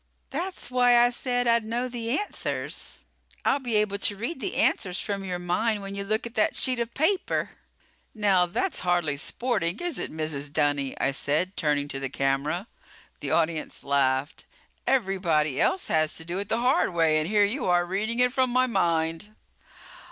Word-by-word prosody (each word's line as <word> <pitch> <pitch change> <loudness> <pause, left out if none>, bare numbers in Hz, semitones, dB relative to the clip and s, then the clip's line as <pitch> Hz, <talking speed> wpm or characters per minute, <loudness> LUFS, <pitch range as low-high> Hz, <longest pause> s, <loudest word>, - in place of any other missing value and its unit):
"That's 345 -1 -4
why 245 -1 +5
I 240 0 +5
said 245 0 -1
that 235 -1 +5
I'd 230 - -4
know 235 +3 -2
the 240 0 -2
answers. 415 - -4 0.4
I'll 280 - +3
be 245 -4 -2
able 210 -1 +1
to 205 - +1
read 240 +10 -4
the 225 - -4
answers 180 -1 +1
from 200 -1 -3
your 180 -2 -3
mind 200 +5 0
when 195 0 -6
you 200 0 -3
look 215 +3 -1
at 235 - -7
that 215 - +1
sheet 255 -2 -1
of 235 0 -3
paper." 365 +6 0 0.6
"Now, 195 -4 +3
that's 245 - -1
hardly 175 -5 +1
sporting, 175 - -1
is 350 -2 -2
it, - - -3
Mrs. 155 -2 -3
Dunny?" 145 -2 0
I 135 - +2
said, 155 +7 0
turning 145 -3 0
to 135 0 -4
the 135 -1 -3
camera. 140 - -1 0.5
The - - -4
audience 160 -1 0
laughed. 140 0 +1 0.4
"Everybody 180 - +2
else 380 - +2
has 155 -1 +1
to 160 - -8
do 175 +3 -3
it 200 - -5
the 225 - +1
hard 250 -7 +2
way 160 -2 +3
and 155 - -2
here 205 +1 +4
you 240 +6 -2
are 175 -1 +3
reading 210 +6 -2
it 250 0 +3
from 260 -1 +2
my 255 +1 +3
mind." 165 -2 -1
195 Hz, 185 wpm, -26 LUFS, 160-240 Hz, 0.6 s, why